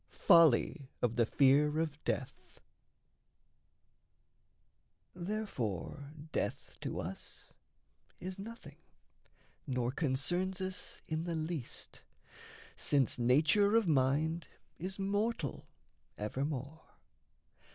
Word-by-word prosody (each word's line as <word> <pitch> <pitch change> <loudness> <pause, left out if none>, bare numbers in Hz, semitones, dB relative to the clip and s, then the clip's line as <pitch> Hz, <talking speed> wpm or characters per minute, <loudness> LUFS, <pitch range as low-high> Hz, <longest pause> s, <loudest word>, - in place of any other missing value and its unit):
FOLLY 155 - +5
OF 120 -2 +2
THE 115 -2 +3
FEAR 145 +3 +4
OF 155 -2 -2
DEATH 130 - -4 2.5
Therefore 150 - -3 0.2
death - - -3
to - - -3
us - - -8 0.7
Is 185 +2 -6
nothing, 230 +4 -9 0.9
nor 125 -2 0
concerns 175 +7 0
us 185 0 -5
in 160 +1 -2
the 170 -1 -2
least, 155 -5 -5 0.7
Since 135 -3 +2
nature 155 - +4
of 230 -4 +4
mind 155 +3 +2 0.3
is 190 +3 -4
mortal 200 - -1 0.5
evermore. 140 +7 -3
155 Hz, 85 wpm, -34 LUFS, 130-185 Hz, 2.5 s, FOLLY